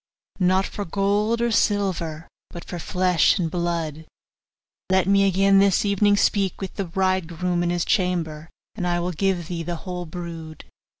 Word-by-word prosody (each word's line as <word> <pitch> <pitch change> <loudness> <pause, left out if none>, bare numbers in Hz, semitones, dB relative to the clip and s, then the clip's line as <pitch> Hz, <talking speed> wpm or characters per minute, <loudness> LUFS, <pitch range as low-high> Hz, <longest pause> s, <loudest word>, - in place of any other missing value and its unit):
'Not 185 +1 +3
for 205 - -5
gold 205 +5 0
or 235 - +1
silver, 180 -7 0 0.2
but 170 - -9
for 175 - -6
flesh 180 -1 +2
and 165 -3 -1
blood: 165 -3 -3 0.8
let 190 -1 +3
me 195 +1 +4
again 195 +1 +4
this 200 0 +3
evening 205 0 +3
speak 195 -2 +1
with 190 - -5
the 195 - -3
bridegroom 180 -1 -1
in 175 - 0
his 175 -1 0
chamber, 165 -5 -1 0.2
and 185 -4 -3
I 175 0 +1
will 175 +1 -2
give 180 -1 -1
thee 175 -2 -4
the 175 +1 -3
whole 180 -2 -5
brood. 165 -2 -8
180 Hz, 165 wpm, -23 LUFS, 170-195 Hz, 0.8 s, me